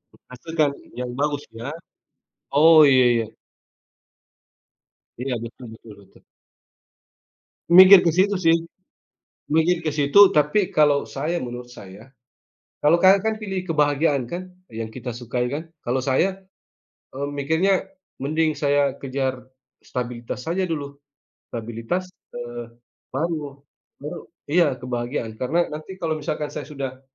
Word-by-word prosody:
E - - -22
pastikan 150 +3 -1 0.3
yang 125 -1 -4
bagus 145 0 -1 0.2
ya. 120 +5 -5 0.9
Oh 160 +1 +8
iya 130 -1 +5
iya. 115 -1 0 1.9
Iya, 130 +1 -2
betul 120 +2 -10
betul 110 -1 -13
betul. 100 - -22 1.5
Mikir 185 +2 +10
ke 170 - +2
situ 190 +5 +2
sih, 165 -1 +5 1.0
mikir 165 +2 +2
ke 155 - 0
situ, 150 +7 +6
tapi 150 +7 +2
kalau 145 -2 +3
saya, 155 +5 -3
menurut 120 0 -7
saya, 105 -1 -13 0.7
kalau 155 +3 +5
Kakak 190 +2 +6
kan 220 0 0
pilih 190 -3 -4
kebahagiaan 145 -5 +1
kan, 185 +7 -7 0.2
yang 110 0 -5
kita 120 0 -7
sukai 120 +1 -3
kan, 155 +6 -5 0.2
kalau 125 +2 0
saya, 185 +9 0 0.7
eee, 140 +2 -4
mikirnya 160 +8 +1 0.4
mending 155 +2 0
saya 145 -2 +1
kejar 130 -2 -3 0.4
stabilitas 125 +2 -5
saja 185 +3 0
dulu. 145 -5 -4 0.6
Stabilitas, 115 +10 -4 0.2
eee 120 -1 -7 0.4
baru 145 -1 -3 0.4
baru - - -6 0.3
iya 160 -5 +3
kebahagiaan, 120 -2 -4
karena 150 +7 0
nanti 155 +5 -7
kalau 160 -2 -2
misalkan 150 0 -4
saya - - -6
sudah 135 -3 -6
145 Hz, 125 wpm, -23 LUFS, 125-165 Hz, 1.9 s, Mikir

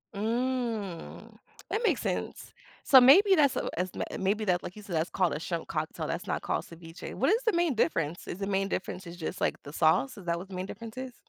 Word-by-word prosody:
Mm. 225 -4 -3 0.3
That 440 - -1
makes - - +2
sense. - - -4 0.3
So, 265 - +9
maybe 375 +11 +7
that's 285 -4 +4
a - - -1
as 185 0 0
ma - - -2 0.2
maybe 200 +3 0
that 180 -2 +2
like 180 - -8
you 210 - -10
said, 190 -5 -5
that's 160 +3 0
called 180 -4 +1
a 150 - -3
shrimp 170 0 -4
cocktail, 155 -1 -3
that's - - -4
not - - -1
called - - -2
ceviche. 165 0 -10
What 270 - +2
is 455 - +3
the 445 - +3
main 340 -4 +2
difference? 165 -5 0
Is 180 - -5
the 195 - -2
main 195 0 +1
difference 185 -1 -4
is 170 - -8
just, 160 - -5
like, - - +1
the 145 - -9
sauce? 175 - +2
Is 190 - -11
that 170 0 0
what 185 +3 -8
the 190 - -7
main 185 +1 -3
difference 225 +3 -9
is? 260 -1 -5
195 Hz, 240 wpm, -29 LUFS, 175-255 Hz, 0.3 s, So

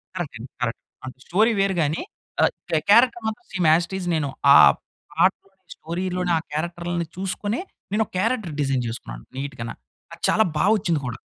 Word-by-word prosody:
Correct 170 -9 -4
అండి 125 +3 -9
correct. 115 -1 -2 0.2
అంటే 130 -1 -8
story 215 +6 +3
వేరు 195 -1 +2
గాని, 155 +2 0 0.4
ఆహ్, - - +4 0.2
క్యా 160 - +2
క్యారెక్టర్ 235 +1 +5
మాత్రం 220 -1 -5
సేమ్, 180 -4 +1
యాజ్ 170 +1 +3
ఇట్ 190 - -4
ఈజ్ 180 - -5
నేను 145 -3 -1 0.3
ఆ - - +11 0.6
పాటలోని 190 +1 0
స్టోరీ‌లోని 180 +2 -2
ఆ - - +1
క్యారెక్టర్‌లని 170 +2 -3
చూసుకొని, 205 +4 -2 0.3
నేనొక 220 -1 0
క్యారెక్టర్ 220 -7 0
డిజైన్ 135 -3 0
చేసుకున్నాను, - - -7
నీట్‌గన. 130 -4 -5 0.4
అది - - -13
చాలా 220 - +4 0.2
బాగా 210 - +4
వచ్చింది 170 -6 0
కూడా. 120 0 -5
175 Hz, 170 wpm, -23 LUFS, 145-195 Hz, 0.6 s, ఆ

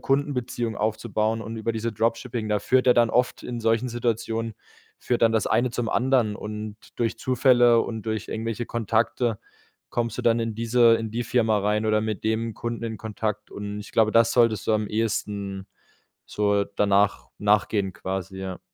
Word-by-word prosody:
Kundenbeziehungen 125 -5 -1
aufzubauen 110 +1 -1
und 115 +1 -6
über 110 +1 -2
diese 115 +1 -2
Dropshipping, 115 +1 -1
da 105 -1 +1
führt 130 +5 +2
ja 125 - +6
dann 120 -1 +4
oft 125 +1 +1
in 120 - -5
solchen 115 +2 +1
Situationen 115 -1 -2 0.5
führt 120 - -1
dann 115 -1 +5
das 110 -2 +1
eine 125 0 +2
zum 120 -1 -2
anderen 120 -5 +2
und 105 0 -6 0.2
durch 115 -2 -1
Zufälle 120 -2 +4
und 110 -2 -5
durch 110 -1 -3
irgendwelche 115 +1 -3
Kontakte 115 0 0 0.5
kommst 115 -2 -2
du - - -2
dann 115 0 +3
in 115 -1 -2
diese 115 +1 +4
in 115 -1 -4
die 120 +2 -2
Firma 115 -3 +2
rein 105 +2 0
oder 110 0 +3
mit 110 -1 -3
dem 110 0 -1
Kunden 115 -1 -4
in 110 -1 -4
Kontakt 105 -1 -4
und 105 0 -6
ich 105 - -10
glaube, 110 -1 +3
das 115 0 +5
solltest 115 -4 +3
du - - +4
am 105 -1 +1
ehesten 100 -3 -2 0.6
so 100 -1 +1
danach 100 0 +2
nachgehen 105 -2 +1
quasi, 95 0 -5
ja. 95 -1 -5
110 Hz, 175 wpm, -25 LUFS, 105-115 Hz, 0.6 s, ja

